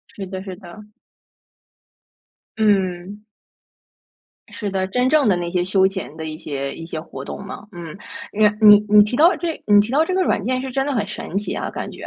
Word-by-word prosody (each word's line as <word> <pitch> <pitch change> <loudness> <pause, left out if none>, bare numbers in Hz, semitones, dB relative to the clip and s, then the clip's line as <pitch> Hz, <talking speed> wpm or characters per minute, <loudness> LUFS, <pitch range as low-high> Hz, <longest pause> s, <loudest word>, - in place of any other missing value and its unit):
是 195 - -6
的 190 0 -6
是 190 -2 -7
的。 205 +3 -13 1.7
嗯。 200 -1 0 1.3
是 210 - -4
的， 190 -1 -1
真 250 +6 +1
正 295 -3 +3
的 195 - +4
那 175 -1 -3
些 180 -1 +1
休 190 +1 +2
闲 190 -6 -6
的 160 - -6
一 155 0 -6
些 140 -3 -5
一 165 - -9
些 160 -1 -5
活 140 -4 -9
动 200 - -7
吗？ 200 +1 -9
嗯， 170 -4 -9 0.4
你 215 0 +4 0.2
你 210 -1 +10
你 210 0 +7
提 210 +4 -3
到 330 +7 +5
这 335 -2 -4
你 205 -1 +6
提 210 +3 +1
到 295 +4 +3
这 370 - -2
个 375 - +1
软 210 - 0
件 255 +3 -1
是 265 - -5
真 270 +2 -1
的 290 - -1
很 210 -5 -1
神 215 -1 -5
奇 205 - -3
啊， - - -3
感 - - -6
觉。 - - -10
205 Hz, 225 characters per minute, -20 LUFS, 180-225 Hz, 1.7 s, 你